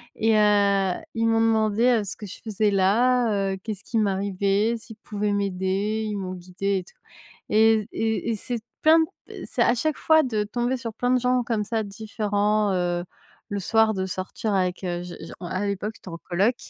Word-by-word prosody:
et 220 0 +2
heu, 200 -2 +3 0.2
ils 225 0 +1
m'ont 225 0 +3
demandé 225 +1 +3
ce 195 - -5
que 210 - -9
je 190 - -9
faisais 215 -1 +1
là, 205 0 +2
heu, - - -4
qu'est-ce 210 -3 -5
qui 230 - -3
m'arrivait, 200 +2 +1
s'ils 225 0 -12
pouvaient 210 -1 -2
m'aider, 200 +2 -1
ils 210 - -3
m'ont 185 -1 -4
guidée 185 +2 -2
et - - -7
tout - - -20 0.6
et 220 0 +4
et 225 +1 -1
et - - 0
c'est 240 +3 -4 0.2
plein 315 +1 +6 0.3
p - - -9
c'est - - -2
à 240 - +3
chaque 310 +5 -1
fois 315 0 +4
de 220 -5 0
tomber 240 +4 -1
sur 230 -2 -6
plein 245 +3 -1
de 255 - +4
gens 250 0 +1
comme 225 -3 -1
ça 220 +1 -1
différents, 210 0 0
heu, 175 -1 0 0.5
le 200 -1 -2
soir 220 +3 +3
de 190 -1 -2
sortir 190 +3 -3
avec, 185 0 0
heu, 175 -1 -2
je 180 - -8
je - - -9
en 175 - -6
à 185 +4 -2
l'époque, 200 +2 -3
j'étais 185 - -12
en 165 - -6
coloc 195 +8 +1
210 Hz, 200 wpm, -24 LUFS, 195-225 Hz, 0.6 s, plein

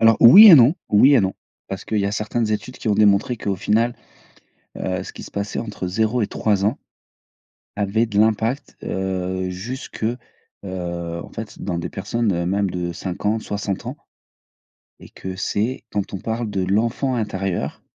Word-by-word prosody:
Alors 115 -1 +6
oui 195 - +11
et 175 - +11
non, 135 +4 +6
oui 130 +7 +6
et 130 - +5
non. 95 -1 -1 0.3
Parce 95 - -6
qu'il 110 - -1
y 100 - +1
a 100 - -2
certaines 110 +1 -1
études 125 +4 -4
qui - - -4
ont 105 - +3
démontré 105 +3 +3
qu'au 100 -3 -2
final, 115 +5 +1 0.8
heu, 90 0 -2
ce - - -9
qui - - -10
se - - -10
passait 100 0 -4
entre 105 -5 -5
0 110 +5 0
et - - +1
3 100 -2 0
ans 110 +7 +1 1.0
avait 105 +3 +1
de 105 -2 -2
l'impact, 110 +5 +1
heu, 95 -1 -2
jusque, 110 +5 -6
heu, 120 +3 -1 1.0
en - - -12
fait 110 -1 -8
dans 90 -3 -2
des 85 - -4
personnes 100 -3 -1
même 100 +1 0
de 90 -1 -3
50, 105 +5 -2
60 100 -2 -4
ans - - -5 1.0
et - - -14
que 95 0 -7
c'est 110 +6 -2
quand 100 -1 -3
on 95 - -3
parle 115 +1 -3
de 95 -2 -1
l'enfant 115 +7 0
intérieur 95 -5 -3
105 Hz, 175 wpm, -21 LUFS, 95-115 Hz, 1.0 s, oui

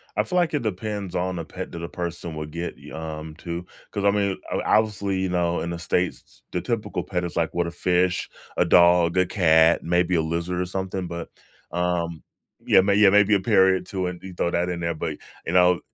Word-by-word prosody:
I - - +2
feel 180 - -2
like 175 -3 +2
it 145 - 0
depends 105 -2 -3
on 90 +1 -1
the 85 - -4
pet - - -7
that 85 - -7
a 85 - -5
person 85 -2 -5
would 75 0 -6
get 85 +2 -4
y - - -13
um, 80 -1 -6
to, 85 +1 -5 0.3
'cause, 100 -2 -3
I 100 - +6
mean, 100 -2 0
o - - 0
obviously, 100 -3 +1
you 95 - 0
know, 85 -1 0
in 85 - -3
the 85 - -5
States, 90 +1 -2
the - - -2
typical - - -2
pet 90 -1 -2
is 85 - -5
like, 85 -1 0
what, 85 -1 0
a 85 - -4
fish, 90 0 +1 0.3
a - - +4
dog, 85 0 +5
a 90 - +4
cat, 80 -3 +4
maybe 90 +1 +2
a 80 - +3
lizard 85 +3 -2
or - - 0
something, 95 0 -3
but, 85 -1 -6 0.4
um, 85 -2 -1 0.4
yeah, - - +6
may 100 +1 +2
yeah, 105 -1 +7
maybe 105 +1 +5
a - - +2
parot 95 -2 +3
too, 95 -2 -3
and 90 -1 -6
you 95 -1 -8
throw 85 - 0
that 85 +1 0
in 85 - -3
there, 85 0 -1
but, - - -4 0.3
you 85 - -3
know, 90 -1 +5
90 Hz, 230 wpm, -24 LUFS, 85-95 Hz, 0.4 s, yeah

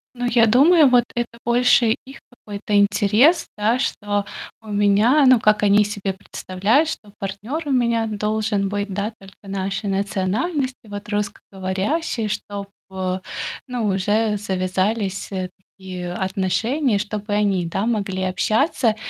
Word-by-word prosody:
Ну, 245 - -4
я 235 -1 +4
думаю, 290 +6 +6
вот 245 -2 +4
это 235 -1 -4
больше 240 -1 +4
их 270 +1 -12
какой-то 210 -3 -6
интерес, 210 - +4
да, 220 +4 +1
что 205 -5 -1 0.4
у 220 - -19
меня, 205 +7 +3
ну, 255 -2 +7
как 210 -1 +2
они 205 +1 +5
себе 200 -1 -3
представляют, 200 - 0
что 210 -9 -7
партнер 205 +11 -4
у - - -2
меня 235 -3 +2
должен 210 -1 -1
быть, 205 0 -3
да, 205 +3 -2
только 195 -1 -15
нашей 195 +1 -3
национальности, 205 - -1
вот, 205 +1 -7
русскоговорящий. 205 - -2
Чтоб, 200 -1 -5 1.0
ну 245 -3 -2
уже 210 +3 +1
завязались, 195 +1 -1
э, 185 -1 -3 0.3
такие 180 -2 -6
отношения, 200 +7 0
чтоб 210 0 -5
и - - -1
они, 200 -4 +1
да, 195 +6 -2
могли 195 -5 -1
общаться. 220 - +1
210 Hz, 135 wpm, -21 LUFS, 195-235 Hz, 1.0 s, ну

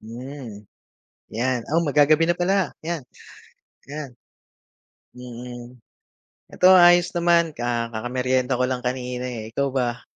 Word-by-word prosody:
Hmm, 120 -2 -9 0.7
yan. 125 +3 0
Oh, 165 - +3
mag 145 - -3
gagabi 155 +3 +4
na 175 - +2
pala 190 +2 0
'yan, 165 -1 -3 0.9
'yan. 145 0 -7 1.1
Mm. 125 0 -10 0.7
Ito 180 - +4
ayos 175 0 +6
naman 170 -2 +2
ka 120 -1 -2
kakameryenda 125 +2 -1
ko - - +3
lang 130 -1 -3
kanina, 125 0 -3
eh. 115 -4 -6
Ikaw 140 +3 0
ba? 125 -2 -2
130 Hz, 125 wpm, -23 LUFS, 120-155 Hz, 1.1 s, ayos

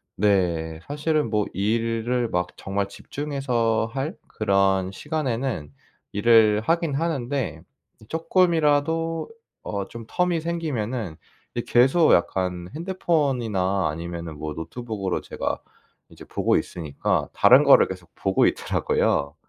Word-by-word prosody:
네 85 -5 +1
사실은 150 -1 0
뭐 105 -1 +1
일을 115 +3 0
막 90 -2 -1
정말 100 0 -2
집중해서 120 -4 -1
할 140 +4 -3
그런 95 -2 +1
시간에는 125 - -3 0.4
일을 110 0 +5
하긴 165 +4 0
하는데 140 -5 -2 0.4
이 - - -15
쪼끔이라도 165 - +1 0.3
어 100 -1 -4
좀 115 -1 -9
term이 175 +1 0
생기면은 130 - -3 0.4
이 120 - 0
계속 135 +7 +4
약간 90 0 0
핸드폰이나 130 - 0
아니면은 85 0 -6
뭐 75 0 -4
노트북으로 100 +2 -4
제가 - - -4 0.5
이제 - - -13
보고 - - +1
있으니까 80 -5 -2
다른 - - +7
거를 - - +7
계속 90 -2 -9
보고 95 0 +2
있더라고요. - - 0
115 Hz, 270 characters per minute, -24 LUFS, 95-145 Hz, 0.5 s, 다른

